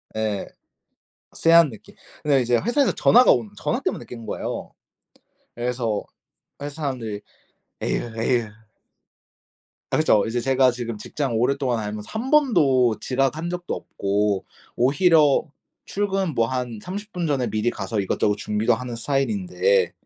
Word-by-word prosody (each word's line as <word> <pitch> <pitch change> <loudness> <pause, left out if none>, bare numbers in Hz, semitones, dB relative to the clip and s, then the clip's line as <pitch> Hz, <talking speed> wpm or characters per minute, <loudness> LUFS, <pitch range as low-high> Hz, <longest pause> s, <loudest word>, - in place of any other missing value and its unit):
예 110 -2 -2 0.9
쎄한 165 -2 +5
느낌. 110 - -14 0.3
근데 140 -3 +3
이제 120 0 +2
회사에서 260 - +2
전화가 250 +2 +5
오는 115 -4 -1
전화 - - -1
때문에 - - -3
깬 115 -2 -9
거예요. - - -5 0.8
그래서 120 -3 -2 0.6
회사 145 +2 -6
사람들이 115 -7 -3 0.6
"에유, 115 -1 -2
에유." 120 -2 +1 1.4
아 - - +1
그렇죠. 110 -10 +3
이제 115 +2 -1
제가 130 0 +3
지금 120 -2 -5
직장 125 +2 -3
오랫동안 130 0 +1
다니면서 105 -1 -5
1 230 +4 -3
번도 135 - +4
지각한 135 +6 0
적도 175 0 -4
없고 100 0 -1 0.3
오히려 150 +3 +4 0.4
출근 195 -4 -1
뭐 115 -3 +2
한 125 -3 -3
30 205 +3 -7
분 175 -3 -2
전에 135 -5 0
미리 110 +2 0
가서 105 -1 -3
이것저것 100 +1 +1
준비도 105 +3 +1
하는 120 +1 -4
스타일인데 185 - +1
125 Hz, 290 characters per minute, -23 LUFS, 115-160 Hz, 1.4 s, 쎄한